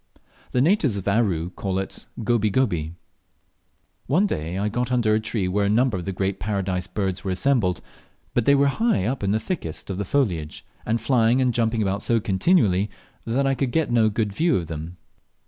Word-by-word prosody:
The 125 - +1
natives 150 - +2
of 95 - -6
Aru 95 -6 +1
call 95 0 -3
it 95 - -4 0.2
"Goby 110 -1 +2
goby." 85 -9 0 1.1
One 175 +10 +3
day 85 - -3
I 100 +2 0
get 120 +3 -2
under 115 -4 +2
a 110 - +3
tree 110 -3 -2
where 100 +2 +1
a - - +1
number 120 +2 +2
of 90 - -4
the 95 - -2
Great 95 +1 -2
Paradise 95 -2 -2
birds 95 -3 -3
were 95 - -3
assembled, 95 -3 +1 0.5
but 120 - +1
they 140 - +5
were 140 0 +4
high 180 - +1
up 125 +3 -2
in 100 - 0
the 110 - +2
thickest 90 - -5
of 95 - -4
the - - 0
foliage, 90 - -1 0.2
and 115 +1 +1
flying 120 -1 +3
and 125 -2 +2
jumping 115 -1 +1
about 100 +1 -1
so 115 +1 +2
continually 105 - +2 0.4
that 130 +5 +1
I 135 - +2
could 135 -1 -1
get 155 -2 0
no 115 -2 +4
good 105 -1 -1
view 165 - +2
of 85 - -3
them. 80 +2 -7
105 Hz, 200 wpm, -23 LUFS, 95-125 Hz, 1.1 s, they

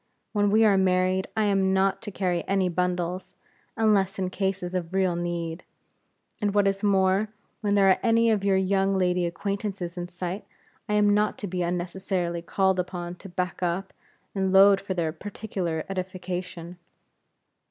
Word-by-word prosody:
When 205 -1 +2
we 220 +2 +5
are 200 -2 +4
married, 185 0 +2
I 220 - +3
am 195 -2 +2
not 195 0 +1
to 230 - -6
carry 180 -3 -1
any 195 -2 +1
bundles, 180 +1 -2 0.4
unless 205 -4 +2
in 185 -1 -2
cases 190 -2 -2
of 180 0 -3
real 185 -2 +2
need; 170 -1 -3 0.8
and 205 -1 0
what 205 -1 +4
is 195 0 0
more, 195 0 +3 0.3
when 205 -2 0
there 195 -1 +5
are 190 - +4
any 230 -1 +3
of 210 -3 +1
your 195 -1 +3
young 195 0 +1
lady 180 -1 +1
acquaintances 195 0 -4
in 175 0 -4
sight, 180 +2 -5 0.5
I - - 0
am 205 0 +4
not 210 0 +1
to - - -5
be 180 0 -3
unnecessarily 175 0 -2
called 190 +2 +1
upon 175 -1 -4
to 195 - -11
back 180 0 -3
up, 180 +2 -2 0.4
and 190 -1 0
load 195 +1 +7
for 195 -1 -4
their 165 -3 0
particular 185 -3 -4
edification." 180 -2 -5
190 Hz, 165 wpm, -26 LUFS, 180-200 Hz, 0.8 s, load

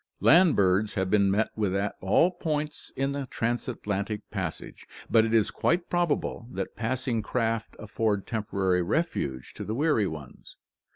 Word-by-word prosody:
Land 175 +1 +6
birds 100 +2 +2
have 95 -1 -1
been 100 -2 +4
met 105 +3 +1
with 100 -3 0
at 100 +1 0
all 105 - +4
points 155 -4 -3
in 135 +1 0
the 140 -1 -4
transatlantic 110 -4 -3
passage, 95 -6 -5 0.2
but 110 -1 +5
it 110 - -2
is 110 -2 +3
quite 170 +1 0
probable 170 -8 0
that - - -4
passing 120 0 -1
craft 115 -1 -2
afford 105 -1 -1
temporary 100 -5 0
refuge 85 - -2
to - - -6
the 110 - -3
weary 140 -7 +2
ones. 75 -6 -9
110 Hz, 155 wpm, -27 LUFS, 100-135 Hz, 0.2 s, Land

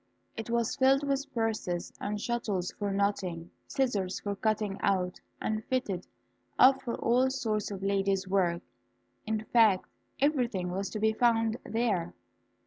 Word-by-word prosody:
It 225 +1 -6
was 235 -1 0
filled 270 +2 +4
with 275 +1 -1
purses, 215 -7 -2
and 210 0 -2
shuttles 215 -6 -1
for 205 - -1
knotting, 190 -4 -1 0.2
scissors 205 -9 0
for 205 -1 -3
cutting 210 -1 -1
out, 185 -2 0 0.2
and 215 0 -2
fitted 210 -9 -2 0.5
up 265 +1 +6
for 235 - -3
all 250 +3 +2
sorts 220 -6 -1
of 195 -2 -6
ladies' 195 -1 +1
work; 180 -2 +1 0.6
in 220 0 -1
fact, 220 -6 +4 0.3
everything 245 - +1
was 195 +2 -2
to 215 - -4
be 220 +1 +3
found 225 -1 +2
there. 215 -7 -1
215 Hz, 140 wpm, -30 LUFS, 195-235 Hz, 0.6 s, up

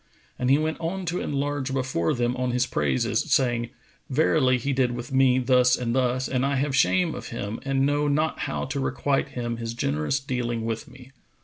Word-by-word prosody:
And 125 - 0
he 135 - +6
went 155 +1 -2
on 180 +3 -3
to 175 +1 -2
enlarge 145 -1 -2
before 130 -11 0
them 120 0 0
on 125 0 -1
his 125 0 +1
praises, 70 - 0
saying, 120 -3 +2 0.4
"Verily, 130 -2 +3
he 135 +3 -2
did 130 -2 +1
with 120 +2 -6
me 130 -1 +4
thus 125 0 +4
and 120 -1 -2
thus 130 0 +1
and 130 -1 0
I 140 0 +1
have 135 0 0
shame 165 +3 +3
of - - -7
him 110 -2 -5
and 135 0 +1
know 145 +1 +1
not 155 +2 0
how - - -2
to 135 +2 -3
requite 140 +1 0
him 120 -1 -2
his 115 0 -5
generous 75 - 0
dealing 120 -4 -3
with 115 +6 -3
me." 130 -1 -15
130 Hz, 200 wpm, -25 LUFS, 120-140 Hz, 0.4 s, he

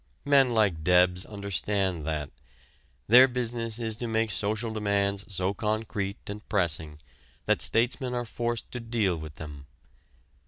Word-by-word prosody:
Men 140 -2 +5
like 105 -9 +1
Debs 90 +1 +4
understand 100 -4 -2
that. 75 -3 -3 0.7
Their 125 +7 +8
business 120 -3 -3
is 115 -2 -2
to 120 - -3
make 110 -1 0
social 110 +3 -1
demands 100 -1 0
so 95 +1 0
concrete 105 -1 -2
and 105 +1 -6
pressing 80 -6 0 0.5
that - - +2
statesmen 125 +2 +1
are 120 0 -2
forced 120 0 -3
to 125 - -5
deal 115 -6 0
with 80 -2 -8
them. 75 -3 -9
105 Hz, 135 wpm, -27 LUFS, 90-115 Hz, 0.7 s, Their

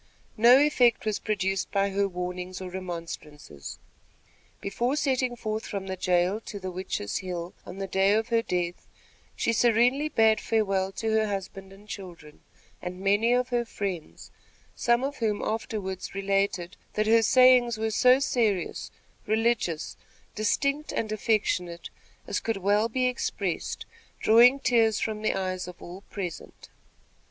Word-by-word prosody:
No 240 +4 +7
effect 260 -6 +3
was 215 -2 -1
produced 195 -2 -1
by 200 0 +1
her 200 +1 +1
warnings 180 0 -5
or 185 -1 -7
remonstrances. 165 - -7 0.8
Before 240 +7 -1
setting 260 -4 0
forth 220 -1 -4
from 200 -2 -4
the 190 0 -4
jail 180 +2 +1
to 210 -2 -8
the 185 -1 -5
Witches' 180 - -3
Hill 180 -2 -5
on 180 - -8
the 195 - -3
day 195 +1 +2
of 220 +1 0
her 230 -1 +3
death, 175 -4 -3 0.5
she 230 - 0
serenely 245 +6 +3
bade 220 -5 +3
farewell 195 -4 0
to 225 +2 -2
her 220 0 +2
husband 195 -1 -5
and 195 +1 -14
many 210 - -20
children, 175 -7 -10 0.4
and 180 0 -6
many 205 +4 +2
of 250 0 +2
her 240 -1 +1
friends, 195 -8 -6 0.4
some 235 +1 +2
of 280 +1 -3
whom 215 -3 -1
afterward 210 -4 -3 0.2
related 195 -2 -1 0.2
that 215 - 0
"her 225 +1 +5
sayings 250 0 +5
were 220 0 -1
so 250 +4 +5
serious, 225 -8 0 0.4
religious, 220 -7 0 0.4
distinct 280 +7 0
and 215 -1 -2
affectionate 200 -6 -1 0.3
as - - -2
could 225 -2 -2
well 205 +4 +2
be 255 +2 0
expressed, 250 0 -2 0.3
drawing 240 +4 +6
tears 225 -5 +3
from 215 -1 -3
the 215 - 0
eyes 185 -1 -3
of 180 -1 -10
all 180 +3 -9
present." 180 -5 -7
210 Hz, 150 wpm, -27 LUFS, 185-230 Hz, 0.8 s, No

